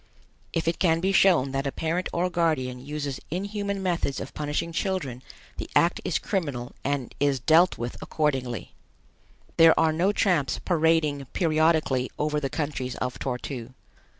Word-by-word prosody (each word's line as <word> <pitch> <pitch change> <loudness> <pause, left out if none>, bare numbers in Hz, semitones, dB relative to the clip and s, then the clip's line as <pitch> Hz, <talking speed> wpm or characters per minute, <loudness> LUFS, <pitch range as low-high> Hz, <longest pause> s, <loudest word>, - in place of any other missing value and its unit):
If 165 -1 -2
it 165 - 0
can 165 -3 +3
be 190 +3 +1
shown 180 -9 +4
that 135 +1 -1
a - - -1
parent 165 +5 -2
or 175 +2 +1
guardian 130 -8 0
uses 145 -1 -4
inhuman 200 +2 -3
methods 170 -6 -1
of - - -7
punishing 150 +2 -2
children, 165 - -2 0.4
the - - -5
act 170 +1 +3
is 175 -4 0
criminal 145 - -3
and 140 -3 -2
is 140 -2 +2
dealt 160 +8 +4
with 120 +1 -5
accordingly. 130 -6 -2 0.8
There 165 0 +7
are 160 -1 +3
no 180 +5 +2
tramps 180 -9 +1
parading 160 -4 +1
periodically 155 -6 +2
over 150 0 0
the 140 -2 -2
countries 140 -5 -3
of 125 0 -4
Tor 125 -2 -2
tu. 125 -1 -7
155 Hz, 155 wpm, -26 LUFS, 135-170 Hz, 0.8 s, There